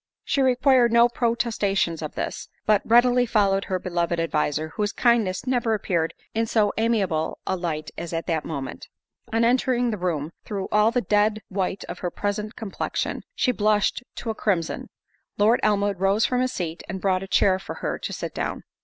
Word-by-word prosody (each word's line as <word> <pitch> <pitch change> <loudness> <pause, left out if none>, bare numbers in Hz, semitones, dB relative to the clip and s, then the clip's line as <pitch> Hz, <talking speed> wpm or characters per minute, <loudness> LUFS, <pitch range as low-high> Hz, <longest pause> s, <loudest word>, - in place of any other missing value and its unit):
She 275 - 0
required 255 -1 +4
no 235 +1 +6
protestations 220 -8 0
of 155 - -6
this, - - -4 0.2
but 210 -2 +4
readily 245 +1 +4
followed 195 -3 +2
her 185 - -1
beloved 175 -2 -1
adviser, 155 -1 0
whose 205 +4 -2
kindness 230 -6 +2
never 240 -3 +1
appeared 170 -5 -1 0.2
in 225 +1 0
so 215 -2 +2
amiable 200 -9 0
a 190 - 0
light 160 -4 -3
as 170 - -5
at 165 0 -3
that 160 -3 -1
moment. 140 -5 -6 0.4
On 225 +1 +2
entering 245 0 +2
the 210 - -4
room, 165 -4 -2
through 195 -2 -4
all 210 +1 +4
the 245 +1 0
dead 210 +1 +1
white 190 0 -2
of - - -7
her 180 - -2
present 210 +4 -3
complection, 215 -4 -3
she 255 - +2
blushed 210 -1 +1
to 230 - -3
a - - -3
crimson. 180 -7 -1 0.5
Lord 220 +4 +4
Elmwood 205 -2 +1
rose 195 +3 +3
from 250 0 +1
his 255 0 0
seat, 170 -2 -4
and 190 +1 -4
brought 185 -1 +1
a 195 - -6
chair 190 -1 +3
for - - -7
her - - -3
to - - -5
sit - - -5
down. - - -3
205 Hz, 185 wpm, -24 LUFS, 180-230 Hz, 0.5 s, no